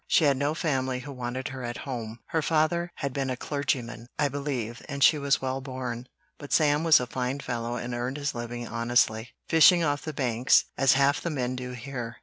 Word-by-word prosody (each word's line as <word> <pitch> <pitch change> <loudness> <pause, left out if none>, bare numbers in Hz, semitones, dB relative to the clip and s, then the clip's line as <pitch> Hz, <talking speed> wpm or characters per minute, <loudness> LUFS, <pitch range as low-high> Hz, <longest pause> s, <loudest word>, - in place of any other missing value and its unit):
She - - +4
had 140 -2 +4
no 145 +3 0
family 130 -5 -1
who 145 +2 -8
wanted 125 0 -4
her 130 -1 -7
at 120 0 -4
home; 115 -4 -5
her 160 - +1
father 165 +3 +1
had 140 -2 -3
been 135 -1 -1
a 130 - -2
clergyman, 125 -5 -3
I 145 -2 +2
believe, 130 -5 -4
and 140 -1 -1
she 150 - +6
was 140 -1 +1
well 130 +1 -2
born, 130 -2 -5 0.3
but 145 -2 -10
Sam 150 -1 +3
was 165 -2 +7
a 125 - -2
fine 125 +2 -3
fellow 120 -3 -3
and 120 0 -4
earned 125 +3 -3
his 145 +1 -2
living 120 0 -5
honestly, 115 0 +1
fishing 170 +2 +6
off 145 -2 0
the 155 - -5
Banks, 125 -3 +3
as 135 0 +4
half 140 +1 +3
the 170 - -2
men 130 -5 -2
do 125 0 -5
here. 120 -2 -6
130 Hz, 210 wpm, -27 LUFS, 120-145 Hz, 0.3 s, was